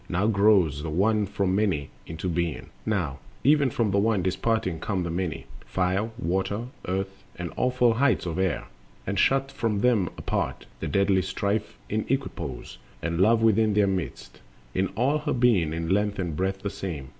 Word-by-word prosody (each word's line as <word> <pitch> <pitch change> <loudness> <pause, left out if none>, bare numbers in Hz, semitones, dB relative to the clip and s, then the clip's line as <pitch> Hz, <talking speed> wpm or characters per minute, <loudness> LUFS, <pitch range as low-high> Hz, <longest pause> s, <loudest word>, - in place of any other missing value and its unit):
Now 95 +3 +1
grows 100 -8 +4
The 80 - -4
One 105 +5 +2
from 100 -1 0
Many 95 -9 0 0.2
into 80 +3 -4
being, 85 -2 -2 0.2
now 85 -11 -1 0.2
Even 145 0 +5
from 115 -3 0
the 100 - +3
One 105 -3 +2
disparting 95 -1 0
come 95 +1 -1
the 85 - -3
Many,— 85 -2 -3 0.2
Fire, 95 +4 0
Water, 100 +5 -1 0.2
Earth 95 +1 -3
and 90 -2 -5
awful 125 -2 +3
heights 125 -6 +2
of 85 +1 -3
Air; 95 -2 0 0.4
And 100 0 -1
shut 135 0 +3
from 105 -3 -1
them 110 -7 +3
apart, - - -2
the - - -3
deadly 100 -1 +3
Strife 100 +3 -2
In 110 +1 -1
equipoise, 135 +1 -3 0.2
and 85 +1 0
Love 115 +3 +4
within 110 -1 +4
their 105 -1 +5
midst 95 -3 -4 0.3
In 95 +1 +1
all 140 +6 +2
her 150 0 -1
being 115 -11 +3
in 80 0 -3
length 105 +2 +1
and 85 -5 -2
breadth 95 +3 -2
the 100 - -2
same. 75 -9 -5
100 Hz, 175 wpm, -26 LUFS, 90-110 Hz, 0.4 s, Even